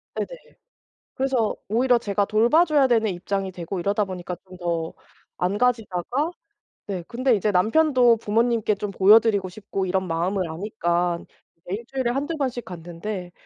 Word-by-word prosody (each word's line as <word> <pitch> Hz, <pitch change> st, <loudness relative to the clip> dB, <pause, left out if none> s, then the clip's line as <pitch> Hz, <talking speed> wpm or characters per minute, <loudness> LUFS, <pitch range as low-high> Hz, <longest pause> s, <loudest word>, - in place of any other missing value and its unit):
네네. -, -, -2 dB, 0.9 s
그래서 260 Hz, -5 st, 0 dB
오히려 245 Hz, +3 st, +3 dB
제가 205 Hz, -2 st, 0 dB
돌봐줘야 285 Hz, -, +4 dB
되는 225 Hz, -4 st, +2 dB
입장이 190 Hz, +2 st, -3 dB
되고 180 Hz, +1 st, -5 dB
이러다 205 Hz, +4 st, +1 dB
보니까 180 Hz, -2 st, -6 dB
좀 185 Hz, 0 st, -12 dB
더 170 Hz, -2 st, -2 dB, 0.5 s
안 185 Hz, +3 st, 0 dB
가지다가 245 Hz, -, 0 dB, 0.6 s
네 190 Hz, -4 st, -4 dB
근데 250 Hz, 0 st, +2 dB
이제 210 Hz, +1 st, 0 dB
남편도 245 Hz, +4 st, +4 dB
부모님께 225 Hz, 0 st, +1 dB
좀 205 Hz, +1 st, -4 dB
보여 200 Hz, +3 st, +7 dB
드리고 205 Hz, -4 st, 0 dB
싶고 195 Hz, 0 st, -4 dB
이런 190 Hz, 0 st, -1 dB
마음을 175 Hz, +2 st, -1 dB
아니까 175 Hz, -1 st, -1 dB, 0.4 s
이제 175 Hz, +3 st, -5 dB
1 225 Hz, -, -7 dB
주일에 260 Hz, -3 st, -1 dB
1-2 290 Hz, +6 st, -2 dB
번씩 255 Hz, -4 st, -2 dB
갔는데 175 Hz, +2 st, -6 dB
205 Hz, 320 characters per minute, -24 LUFS, 180-240 Hz, 0.9 s, 보여